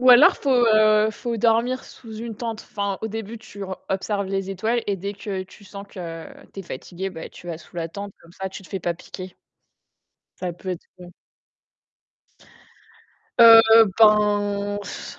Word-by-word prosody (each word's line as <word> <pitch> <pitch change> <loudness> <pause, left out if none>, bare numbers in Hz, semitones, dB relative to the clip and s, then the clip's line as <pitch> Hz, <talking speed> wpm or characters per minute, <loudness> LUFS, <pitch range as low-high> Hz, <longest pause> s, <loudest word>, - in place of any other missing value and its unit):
Ou 255 0 +6
alors 245 +4 +8
faut, 280 - -2
heu, 215 -3 +5
faut 235 +2 -4
dormir 235 +3 +1
sous 220 -3 -12
une 230 0 -6
tente. 225 -1 -5
Enfin, 200 -1 -3
au 220 - -3
début, 225 +1 -6
tu 205 -2 -11
o 190 -1 -5
observes 200 +1 -2
les 195 0 -3
étoiles 220 +5 -1
et 200 - 0
dès 200 +3 -5
que 195 -2 -5
tu 195 - -18
sens 200 +1 -10
que 165 -4 -7 0.3
tu - - -11
es - - -8
fatiguée, 175 +6 -6
bah, 160 -3 -8
tu 175 - -14
vas 165 -2 -5
sous 175 - -17
la 165 -1 -2
tente, 200 +3 -7
comme 170 - -18
ça, 190 +1 -5
tu 190 - -10
te - - -15
fais 195 - -4
pas 175 - -1
piquer. 185 +2 -10 1.0
Ça 180 -1 -4
peut 180 +2 -10
être 175 - -5
u 180 - -11 2.3
Heu 225 -1 +9
ben 205 -1 +3
s - - -8
205 Hz, 180 wpm, -23 LUFS, 190-225 Hz, 2.3 s, Heu